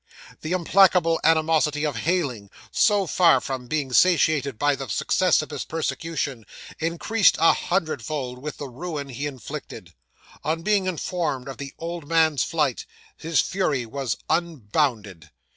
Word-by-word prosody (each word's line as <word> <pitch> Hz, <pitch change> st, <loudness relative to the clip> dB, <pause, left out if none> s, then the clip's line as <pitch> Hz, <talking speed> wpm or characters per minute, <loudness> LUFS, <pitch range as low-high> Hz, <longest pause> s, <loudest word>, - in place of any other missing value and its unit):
'The 155 Hz, -, -5 dB
implacable 180 Hz, -2 st, +4 dB
animosity 155 Hz, -2 st, +2 dB
of 150 Hz, -, -2 dB
Heyling, 140 Hz, -, -1 dB, 0.2 s
so 205 Hz, -3 st, +3 dB
far 175 Hz, 0 st, +4 dB
from 130 Hz, -3 st, -5 dB
being 140 Hz, -2 st, -2 dB
satiated 155 Hz, -6 st, +3 dB
by 145 Hz, +3 st, +2 dB
the 135 Hz, -1 st, -6 dB
success 170 Hz, -, +2 dB
of -, -, -10 dB
his -, -, -4 dB
persecution, 155 Hz, -5 st, -3 dB, 0.4 s
increased 170 Hz, +7 st, +2 dB
a 165 Hz, -, +6 dB
hundredfold 145 Hz, -, -2 dB
with 150 Hz, +3 st, -6 dB
the 145 Hz, -, -6 dB
ruin 145 Hz, +2 st, -6 dB
he 140 Hz, +3 st, -4 dB
inflicted. 130 Hz, -6 st, -8 dB, 0.5 s
On 160 Hz, +2 st, -2 dB
being 200 Hz, -2 st, +2 dB
informed 170 Hz, -7 st, -2 dB
of 135 Hz, -3 st, -7 dB
the 140 Hz, -1 st, -7 dB
old 170 Hz, -2 st, -6 dB
man's 160 Hz, -4 st, +3 dB
flight, 150 Hz, -5 st, -1 dB, 0.3 s
his 165 Hz, -1 st, +1 dB
fury 150 Hz, -10 st, -1 dB
was 125 Hz, -3 st, -3 dB
unbounded. 120 Hz, -, -1 dB
155 Hz, 140 wpm, -24 LUFS, 135-170 Hz, 0.5 s, a